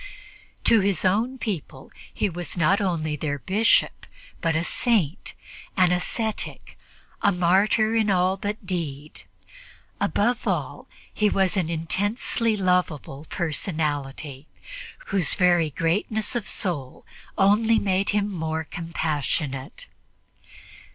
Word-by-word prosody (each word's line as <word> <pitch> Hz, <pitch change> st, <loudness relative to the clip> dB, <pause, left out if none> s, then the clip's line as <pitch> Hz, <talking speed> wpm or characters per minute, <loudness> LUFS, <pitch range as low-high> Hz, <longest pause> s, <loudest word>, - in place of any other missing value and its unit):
To 230 Hz, -, +5 dB
his 195 Hz, -3 st, +1 dB
own 225 Hz, +8 st, +1 dB
people 175 Hz, -, -5 dB, 0.2 s
he -, -, 0 dB
was 175 Hz, -1 st, -5 dB
not 185 Hz, +6 st, +3 dB
only 160 Hz, -5 st, -1 dB
their 145 Hz, 0 st, -2 dB
Bishop, 205 Hz, -, +2 dB, 0.3 s
but 165 Hz, -2 st, +1 dB
a 160 Hz, -, +1 dB
Saint, 200 Hz, -, 0 dB, 0.4 s
an 180 Hz, -1 st, +5 dB
ascetic, 215 Hz, +5 st, -2 dB, 0.5 s
a 200 Hz, -, +4 dB
martyr 195 Hz, +5 st, +3 dB
in 220 Hz, -2 st, +2 dB
all 185 Hz, 0 st, +3 dB
but 205 Hz, +1 st, -5 dB
deed; 155 Hz, -5 st, -4 dB, 0.8 s
above 240 Hz, +4 st, 0 dB
all, -, -, -2 dB, 0.3 s
he 210 Hz, -1 st, +2 dB
was 190 Hz, -1 st, +1 dB
an 180 Hz, -4 st, 0 dB
intensely 205 Hz, +7 st, -1 dB
lovable 180 Hz, -6 st, -1 dB
personality, 150 Hz, -4 st, -3 dB, 0.7 s
whose 185 Hz, -5 st, +3 dB
very 175 Hz, -3 st, +3 dB
greatness 205 Hz, -, -1 dB
of 235 Hz, -, -2 dB
soul 145 Hz, -9 st, -3 dB, 0.3 s
only 215 Hz, +3 st, +4 dB
made 195 Hz, -1 st, +1 dB
him 205 Hz, 0 st, +1 dB
more 160 Hz, -4 st, -3 dB
compassionate. 155 Hz, -, -3 dB
180 Hz, 110 wpm, -24 LUFS, 160-205 Hz, 0.8 s, To